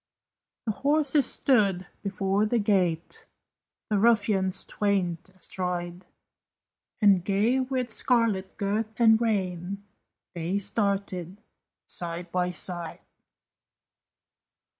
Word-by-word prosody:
The 220 - +1
horses 285 +2 +2
stood 200 -8 +2 0.2
before 200 +1 0
the 240 - +1
gate, 200 - 0 0.6
The 205 - +3
ruffians 205 -4 +2
twain 190 -5 0 0.2
astride; 180 0 -4 1.0
And 195 -4 +5
gay 210 +7 +2
with 255 -2 -2
scarlet 220 -6 +1
girth 215 +2 -2
and 225 -1 +6
rein 195 -3 -2 0.5
They 175 +3 -2
started, 200 -2 -2 0.5
side 175 0 -5
by 180 -1 0
side. 175 -2 -6
200 Hz, 90 wpm, -27 LUFS, 180-220 Hz, 1.0 s, and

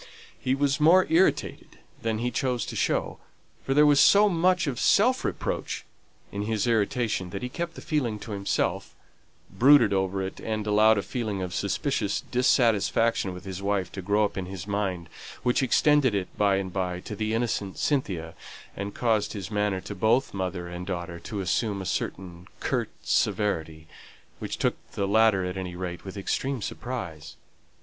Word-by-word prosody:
He 130 - 0
was 140 +1 +1
more 175 +5 +6
irritated 175 +4 +1 0.2
than 115 -1 -1
he 120 +2 -1
chose 125 0 -1
to - - -6
show; - - -1 0.4
for 135 - -1
there 150 +1 +6
was 145 -1 +5
so 205 +1 +7
much 180 0 +2
of 135 -5 -3
self 250 +5 +3
reproach - - -3 0.5
in 100 - -4
his 110 0 0
irritation 110 -4 0
that 100 +4 -6
he 125 - -3
kept 170 +5 -5
it 125 -10 -1
to 115 - -8
himself, 100 -1 -2 0.6
brooded 130 -5 +6
over 95 0 0
it, 95 - -6
and 110 -1 -3
allowed 110 +1 +5
a 100 - -1
feeling 110 -7 -3
of 90 -1 -5
suspicious - - -1
dissatisfaction 115 -4 +2
with 90 +1 -9
his 95 0 -6
wife 100 -2 -1
to 95 - -6
grow 105 +3 +2
up 100 - -5
in 90 - -5
his 95 -2 -7
mind, 100 -4 -2 0.4
which 125 +1 +2
extended 135 -1 +3
itself 95 -2 -3
by 100 -1 +3
and 95 -2 -3
by 90 -2 -2
to 105 - -7
the 110 +1 -1
innocent 110 -5 -2
Cynthia, 95 - -1 0.4
and 100 +1 -5
caused 110 -3 +1
his 100 -1 -6
manner 105 -2 0
to 100 - -7
both 110 +7 +1
mother 90 -2 -3
and 90 +1 -7
daughter 85 -2 -4
to 100 +4 -5
assume 100 +3 0
a 95 - -5
certain 90 -1 -4
curt - - -1
severity, 80 -6 0 0.5
which - - -4
took - - 0 0.2
the 100 - -1
latter 105 -2 +4
at 90 +1 -4
any 90 -2 -5
rate 90 -1 -5
with 95 +1 -8
extreme 130 +5 -2
surprise. 85 -11 -6
105 Hz, 175 wpm, -26 LUFS, 95-125 Hz, 0.6 s, so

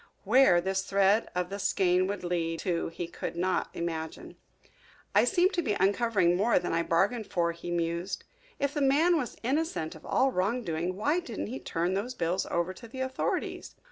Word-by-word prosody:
Where 225 -4 +5
this 190 +2 0
thread 200 +3 +2
of 180 +1 -1
the 200 - -4
skein 185 -1 +2
would 200 -1 -4
lead 170 -2 -1
to 175 -3 -1
he 165 +1 -5
could 170 0 -6
not 185 +2 0
imagine. 160 -2 -5 0.8
"I - - +5
seem 370 0 +3
to 355 - 0
be 210 -10 -1
uncovering 200 -2 +3
more 210 +6 +3
than 175 - -1
I 165 - +2
bargained 200 +7 +1
for," 170 -1 0
he 170 +1 -8
mused. 170 +2 -2 0.3
"If 280 0 -1
the 295 - -1
man 300 +6 +4
was 260 -7 -2
innocent 270 - -1
of 160 - -13
all 265 0 +2
wrong 230 +5 0
doing 170 0 -2
why 290 - +1
didn't 235 - -5
he 265 - -4
turn 170 +3 -1
those 225 +7 -2
bills 175 0 -1
over 170 +2 -1
to 230 +5 -12
the 260 +3 -7
authorities? 260 0 -3
190 Hz, 190 wpm, -29 LUFS, 170-245 Hz, 0.8 s, Where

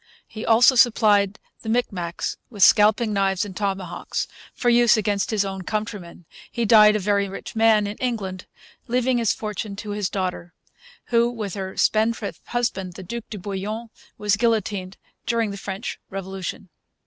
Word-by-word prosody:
He 220 - -8
also 235 +3 +6
supplied 215 -5 +4 0.2
the 220 - -6
Micmacs 195 -8 -2
with 205 -5 0
scalping 215 +2 +5
knives 195 -1 +1
and 195 -3 -9
tomahawks 195 -3 -3 0.2
for 245 - -4
use 240 -1 +5
against 205 -2 0
his 210 -3 +1
own 190 -1 -5
countrymen. 200 -4 -5 0.3
He 235 -1 -1
died, 210 -1 +7
a - - +1
very 200 0 +1
rich 195 - -8
man, 220 -2 +4
in 205 +1 -5
England, 200 -7 -3 0.4
leaving 250 +1 +1
his 230 -3 +2
fortune 210 -1 -4
to 205 +1 -6
his 205 -2 -2
daughter, 180 -2 -4 0.5
who, 235 0 +3
with 215 -6 -5
her 190 -1 -5
spendthrift 220 -1 +1
husband, 195 -7 -2
the 190 - -9
Duc 235 +5 -6
de 215 - -6
Bouillon, 210 +4 -5 0.3
was 205 -1 +1
guillotined 205 -4 -1 0.3
during 230 -3 +1
the - - -6
French 195 +2 -5
Revolution. 190 0 -6
210 Hz, 160 wpm, -23 LUFS, 195-225 Hz, 0.5 s, died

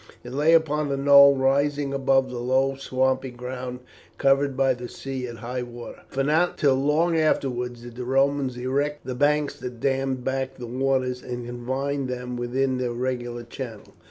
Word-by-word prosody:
It 125 - -8
lay 150 +4 +3
upon 150 -3 +2
a 140 - 0
knoll 140 0 +7
rising 140 +1 +1
above 135 -1 +2
the 125 - -5
low 130 +2 +1
swampy 130 0 0
ground 125 0 -6 0.4
covered 135 0 +2
by 135 -1 +3
the 120 -1 -8
sea 130 -2 -5
at 120 - -7
high 125 +2 -4
water, 120 -1 -9
for 135 - -2
not 160 +5 +2
till 140 -3 +4
long 150 +5 +2
afterwards 125 -6 0
did 120 0 -10
the 125 - -4
Romans 135 0 +1
erect 140 +4 -2
the 130 - -3
banks 145 +2 +2
that 125 -2 -7
dammed 135 -1 0
back 130 0 -2
the 125 - -7
waters 130 0 0
and 125 -1 -6
confined 130 +3 -3
them 125 0 -4
within 130 +2 -1
their 125 -1 -1
regular 120 -1 -3
channel. 115 -2 -8
130 Hz, 175 wpm, -25 LUFS, 125-140 Hz, 0.4 s, knoll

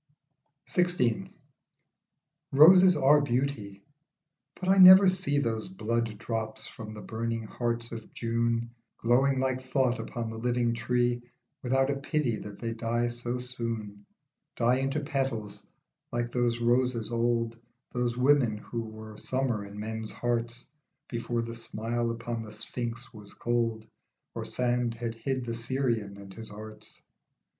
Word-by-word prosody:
'* 145 0 -45
XVI. 125 - +1 1.2
ROSES 180 +6 +8
are 145 +1 +5
beauty, 120 -7 -2 0.8
but 185 - -4
I 190 +1 +5
never 185 +1 +11
see 185 -6 +1
Those 115 -1 -1
blood 115 - -2
drops 110 0 -3
from 110 -1 -9
the 105 - -8
burning 115 +2 -3
heart 120 +1 -2
of 115 -1 -8
June 115 0 -1 0.3
Glowing 130 +3 +3
like 130 -1 0
thought 130 -2 +1
upon 115 0 -4
the 110 - -6
living 120 0 +1
tree 120 +1 0 0.4
Without 135 +2 +2
a 140 - -1
pity 140 -4 0
that 105 -1 -8
they 115 -1 -3
die 115 +1 0
so 120 +1 -3
soon, 115 -5 -5 0.5
Die 120 +2 +3
into 135 +3 -1
petals, 135 -8 -3 0.5
like 120 0 -2
those 120 -1 +1
roses 120 -1 +1
old, 115 0 0 0.3
Those 120 -1 -1
women, 125 -4 +3
who 115 +2 -5
were 110 -1 -9
summer 130 -5 -1
in 100 +1 -9
men's 110 0 -4
hearts 120 0 -2 0.4
Before 120 0 -2
the 115 0 -6
smile 115 +1 -3
upon 115 0 -3
the 110 -1 -8
Sphinx 120 +3 -3
was 105 -2 -12
cold 115 -2 -1 0.5
Or - - -4
sand 120 -1 0
had 115 0 -3
hid 130 +2 -3
the 115 - -3
Syrian 115 -4 -1
and 100 -1 -11
his 110 +2 -8
arts. 110 +1 -9
120 Hz, 140 wpm, -29 LUFS, 115-130 Hz, 1.2 s, never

